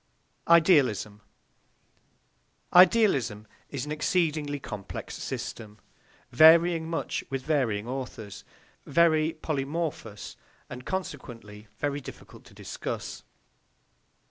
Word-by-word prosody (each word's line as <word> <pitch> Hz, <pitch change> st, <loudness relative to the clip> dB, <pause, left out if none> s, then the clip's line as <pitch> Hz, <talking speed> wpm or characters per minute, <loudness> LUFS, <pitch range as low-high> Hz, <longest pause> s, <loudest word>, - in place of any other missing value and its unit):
IDEALISM 140 Hz, -, +4 dB, 1.5 s
Idealism 175 Hz, -, +4 dB, 0.2 s
is 140 Hz, -1 st, -4 dB
an 150 Hz, -, -7 dB
exceedingly 150 Hz, -2 st, 0 dB
complex 105 Hz, -6 st, -7 dB
system, 105 Hz, -2 st, -6 dB, 0.5 s
varying 160 Hz, +4 st, +6 dB
much 165 Hz, -, -3 dB
with 135 Hz, -1 st, -4 dB
varying 125 Hz, -8 st, 0 dB
authors, 125 Hz, -5 st, -6 dB, 0.4 s
very 155 Hz, +1 st, +3 dB
polymorphous, 145 Hz, -, -4 dB, 0.3 s
and 125 Hz, 0 st, -8 dB
consequently 115 Hz, -, -6 dB
very 145 Hz, 0 st, -2 dB
difficult -, -, -12 dB
to -, -, -17 dB
discuss. -, -, -6 dB
145 Hz, 85 wpm, -27 LUFS, 115-165 Hz, 1.5 s, varying